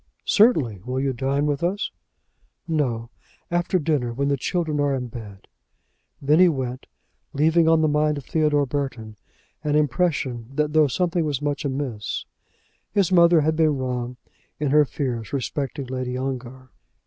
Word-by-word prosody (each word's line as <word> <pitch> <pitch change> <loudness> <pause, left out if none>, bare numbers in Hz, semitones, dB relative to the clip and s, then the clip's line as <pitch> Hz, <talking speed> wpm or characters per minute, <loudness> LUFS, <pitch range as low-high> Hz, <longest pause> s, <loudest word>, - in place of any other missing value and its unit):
"Certainly. 145 - +3
Will 125 +2 -3
you 135 0 0
dine 135 +3 0
with 145 -2 -1
us?" 185 +5 -1 0.8
"No; 125 -8 -1 0.4
after 175 +2 +1
dinner; 145 -7 0
when 140 +4 -1
the 140 - +2
children 155 +2 -1
are 145 -1 +2
in 125 -2 -4
bed." 105 -4 -10 0.7
Then 150 +4 +3
he 180 -1 +7
went, 130 -3 -4 0.5
leaving 160 +3 +3
on 165 -1 +4
the 155 - +3
mind 150 0 +1
of 140 - -7
Theodore 150 -2 +2
Burton 125 -6 -4 0.5
an 150 -1 0
impression 135 -5 0
that 150 0 0
though 155 -1 +5
something 175 +4 0
was 145 -4 -1
much 145 0 -2
amiss, 130 - -3 0.7
his 200 -4 +2
mother 170 -2 +6
had 155 +2 +1
been 155 -3 +2
wrong 125 -1 -3 0.4
in 145 -2 0
her 150 0 +6
fears 120 -3 -4
respecting 140 +1 -3
Lady 130 0 -3
Ongar. 130 -1 -5
140 Hz, 155 wpm, -23 LUFS, 125-155 Hz, 0.8 s, he